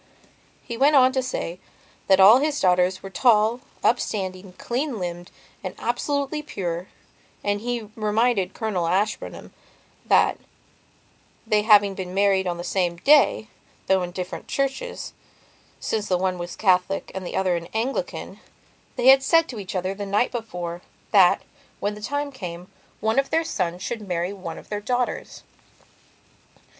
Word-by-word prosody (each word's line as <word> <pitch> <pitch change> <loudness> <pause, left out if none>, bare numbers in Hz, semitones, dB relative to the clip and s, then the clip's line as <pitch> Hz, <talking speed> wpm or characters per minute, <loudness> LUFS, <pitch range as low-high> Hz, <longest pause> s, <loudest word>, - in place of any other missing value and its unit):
He 235 -2 -6
went 285 +4 +4
on 260 -1 +6
to 260 0 0
say 180 -8 -4 0.5
that 190 -1 +5
all 210 +6 +9
his 295 +1 0
daughters 180 0 +2
were 195 - -8
tall, 225 +1 +3 0.2
upstanding, 190 -5 -1
clean 250 +5 -3
limbed 175 -2 -5 0.3
and - - -5
absolutely 285 +4 -1
pure, 180 - -4 0.6
and 205 0 0
he 240 0 -2
reminded 215 -2 +1
Colonel 195 -7 -1
Ashburnham 200 +5 -2 0.5
that, - - +3 1.1
they 215 -2 +2
having 205 -2 +5
been 185 -1 -6
married 195 -1 +3
on 175 -1 -2
the 175 - -6
same 175 -2 0
day, 275 - +4 0.4
though 190 -1 +3
in 180 - -3
different 180 0 -6
churches, 275 - -3 0.7
since 215 -2 -2
the 180 - +2
one 185 0 -1
was 175 0 -6
a - - -27
Catholic 190 -1 +1
and 190 - -5
the 175 - -6
other 185 -2 +1
an 170 0 -5
Anglicanthey 245 +1 -5
had 270 0 +8
said 330 +4 +3
to 235 - -6
each 195 -1 -7
other, 185 +1 -1
the 200 0 -6
night 205 +5 +1
before, 175 -7 -5 0.3
that, 190 -4 +5 0.4
when 205 +1 -1
the 210 - -10
time 285 +5 -2
came, 180 -8 -8 0.3
one 220 +4 +2
of 275 - 0
their 325 +1 +2
sons 180 - -3
should 215 -1 -5
marry 175 +1 -2
one 180 -4 -7
of - - -13
their 205 -1 -3
daughters. 245 +3 -2
205 Hz, 155 wpm, -24 LUFS, 185-245 Hz, 1.1 s, all